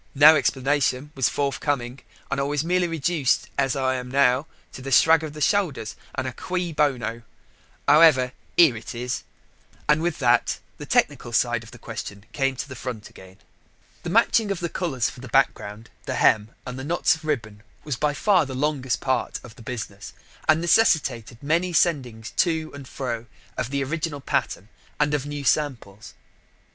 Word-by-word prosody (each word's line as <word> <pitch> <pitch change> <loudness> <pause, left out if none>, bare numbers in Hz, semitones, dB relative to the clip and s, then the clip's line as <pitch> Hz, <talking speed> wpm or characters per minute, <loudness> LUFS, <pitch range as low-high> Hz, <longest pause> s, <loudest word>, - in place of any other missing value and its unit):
no 155 +3 +9
explanation 140 0 0
was 130 -3 +1
forthcoming. 140 -2 -2 0.3
And 140 - 0
I - - +1
was 145 +1 -1
merely 180 +1 +2
reduced, 165 -3 0
as 135 -1 +1
I 130 -1 +1
am 125 0 -6
now, 135 +2 +3 0.2
to - - -10
a - - -3
shrug 160 +3 +6
of 155 -2 -5
the 150 - -8
shoulders, 150 - 0 0.2
and 130 - -2
a 130 - -4
cui 180 +1 -3
bono. 125 -6 0 0.7
However, 145 -4 +6 0.3
here 160 -8 +7
it 110 +2 -8
is," 125 +1 -3 0.7
and 150 +1 +4
with 170 -1 -1
that 120 -3 +2 0.2
the - - -8
technical 120 - +1
side 120 0 +1
of 115 - -13
the 120 - -12
question 105 -3 -7
came 135 0 0
to 130 - -5
the 130 - -8
front 120 -3 -6
again. 95 0 -15 0.6
The - - -5
matching 220 -3 +3
of 195 -3 -2
the 170 - -2
colours 140 -10 -1
for - - -8
the 130 - -9
background, 115 -4 0 0.2
the - - -2
hem, 105 0 +3 0.2
and 125 0 -6
the - - -5
knots 170 +5 +2
of 160 - -8
ribbon 110 -9 -3 0.2
was 150 -4 -3
by 150 +2 0
far 185 -7 +3
the 130 - -6
longest 135 -2 -1
part 130 -2 -1
of 120 -2 -12
the 125 - -14
business, 110 -4 -7 0.4
and 155 +1 +5
necessitated 145 - +2
many 170 +5 +1
sendings 130 -9 0
to 160 -3 +1
and 140 -2 -9
fro 120 -4 -4 0.3
of 125 -1 -3
the 140 0 -1
original 155 +1 -3
pattern 105 -6 -2 0.3
and 150 0 +2
of 145 -1 -1
new 145 -1 -5
samples. 125 -8 -1
135 Hz, 180 wpm, -24 LUFS, 120-155 Hz, 0.7 s, no